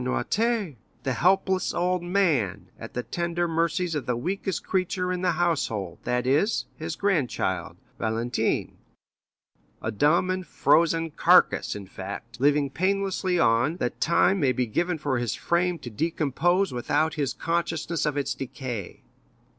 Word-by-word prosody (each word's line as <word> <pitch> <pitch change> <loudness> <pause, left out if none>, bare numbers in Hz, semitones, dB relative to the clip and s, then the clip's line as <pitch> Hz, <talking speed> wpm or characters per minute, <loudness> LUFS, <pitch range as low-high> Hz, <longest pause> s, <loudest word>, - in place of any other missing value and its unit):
Noirtier_, 205 - 0 0.3
the 135 - 0
helpless 190 +6 +2
old 180 +1 +1
man, 135 - 0
at 115 - -9
the 125 - -2
tender 170 +2 -1
mercies 170 +1 0
of 145 -3 -3
the 125 -1 0
weakest 190 +6 -2
creature 185 -1 -1
in 180 - -3
the 180 -2 +2
household, 140 - -1
that 125 0 0
is, 150 - +2
his - - -5
grandchild, 145 - -1 0.2
Valentine; 115 +2 -1 1.0
a 110 - -3
dumb 155 - +2
and 185 -2 -3
frozen 165 +3 +2
carcass, - - +4
in 100 -1 -7
fact, 100 +5 -8
living 145 0 +3
painlessly 190 +2 0
on, 120 +5 +3
that 120 - -3
time 190 +3 +3
may 140 -5 +3
be 125 +1 0
given 170 +9 -1
for 145 -4 -1
his 120 -3 -1
frame 175 0 0
to 120 - -9
decompose 165 - +1
without 145 +6 0
his 145 -4 -1
consciousness 165 -1 -1
of 150 -1 0
its 140 - -1
decay." 125 -6 -6
160 Hz, 145 wpm, -26 LUFS, 125-180 Hz, 1.0 s, carcass